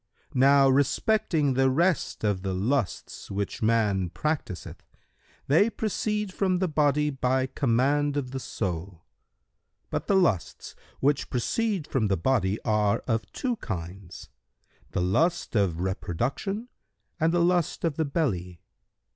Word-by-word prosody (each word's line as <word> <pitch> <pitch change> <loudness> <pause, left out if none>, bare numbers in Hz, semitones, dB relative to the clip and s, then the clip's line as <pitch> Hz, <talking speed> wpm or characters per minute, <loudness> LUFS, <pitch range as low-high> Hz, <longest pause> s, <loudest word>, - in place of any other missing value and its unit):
Now 135 +1 +5
respecting 145 - +2
the 135 +1 +3
rest 170 +2 +1
of 100 -3 0
the 95 -1 -2
lusts 115 +3 -2
which 100 0 -3
man 105 -5 +2
practiseth, 140 - -4 0.6
they 165 +11 +4
proceed 210 -2 -2
from 185 -2 +1
the 185 +1 0
body 150 -1 +2
by 130 -1 +1
command 140 +3 +1
of 130 -3 -3
the 135 - -4
soul. 90 -6 -4 0.9
But - - -3
the 200 - +3
lusts 135 - 0 0.3
which 140 +1 +1
proceed 195 - -1
from 120 -7 0
the 95 - +1
body 105 0 +1
are 105 -2 +1
of 115 -3 -1
two 250 -3 -2
kinds, 90 - -7 0.6
the - - -2
lust 160 - +1
of 90 -5 +1
reproduction 130 - -2 0.5
and 160 +1 +3
the 175 0 +2
lust 175 -2 +1
of 165 -4 0
the 160 - +2
belly. 95 - -2
130 Hz, 130 wpm, -27 LUFS, 100-160 Hz, 0.9 s, Now